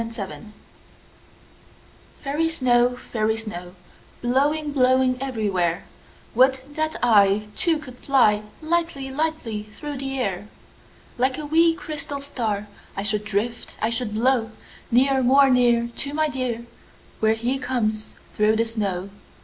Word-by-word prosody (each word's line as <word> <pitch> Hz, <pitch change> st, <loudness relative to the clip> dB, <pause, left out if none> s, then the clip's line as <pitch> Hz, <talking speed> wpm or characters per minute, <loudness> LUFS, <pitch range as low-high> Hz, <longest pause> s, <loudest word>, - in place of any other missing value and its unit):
Snow 230 Hz, -, -4 dB, 0.2 s
Song 215 Hz, -1 st, -11 dB, 1.7 s
FAIRY 300 Hz, +4 st, 0 dB
snow, 250 Hz, -5 st, +2 dB
fairy 220 Hz, -2 st, -1 dB
snow, 180 Hz, -5 st, -7 dB, 0.5 s
Blowing, 290 Hz, +5 st, +1 dB
blowing 255 Hz, -1 st, +3 dB
everywhere, 200 Hz, -10 st, -1 dB, 0.5 s
Would 260 Hz, +2 st, +4 dB
that 310 Hz, +1 st, -1 dB
I 210 Hz, -2 st, +4 dB
Too, 335 Hz, -3 st, +2 dB
could 255 Hz, -5 st, -11 dB
fly 220 Hz, -7 st, +3 dB, 0.2 s
Lightly, 320 Hz, -5 st, -1 dB
lightly 280 Hz, -7 st, -2 dB
through 275 Hz, +7 st, -7 dB
the 270 Hz, 0 st, -3 dB
air. 200 Hz, -5 st, -2 dB, 0.7 s
Like 260 Hz, +1 st, +2 dB
a 305 Hz, -, -5 dB
wee, 325 Hz, +2 st, +4 dB
crystal 300 Hz, -4 st, -5 dB
star 225 Hz, -7 st, -3 dB, 0.3 s
I 195 Hz, -, -1 dB
should 210 Hz, 0 st, 0 dB
drift, 215 Hz, +3 st, -3 dB
I 220 Hz, -, 0 dB
should 230 Hz, -2 st, -2 dB
blow 235 Hz, 0 st, +2 dB, 0.4 s
Near, 265 Hz, +3 st, +3 dB
more 270 Hz, +2 st, +5 dB
near, 240 Hz, -2 st, +3 dB
To 285 Hz, +1 st, -2 dB
my 310 Hz, 0 st, +2 dB
dear 250 Hz, -4 st, -3 dB, 0.5 s
Where 220 Hz, 0 st, +3 dB
he 245 Hz, +4 st, -1 dB
comes 220 Hz, -5 st, -2 dB, 0.2 s
through 215 Hz, +1 st, +3 dB
the 225 Hz, +1 st, +2 dB
snow. 200 Hz, -4 st, -3 dB
245 Hz, 135 wpm, -23 LUFS, 215-275 Hz, 1.7 s, more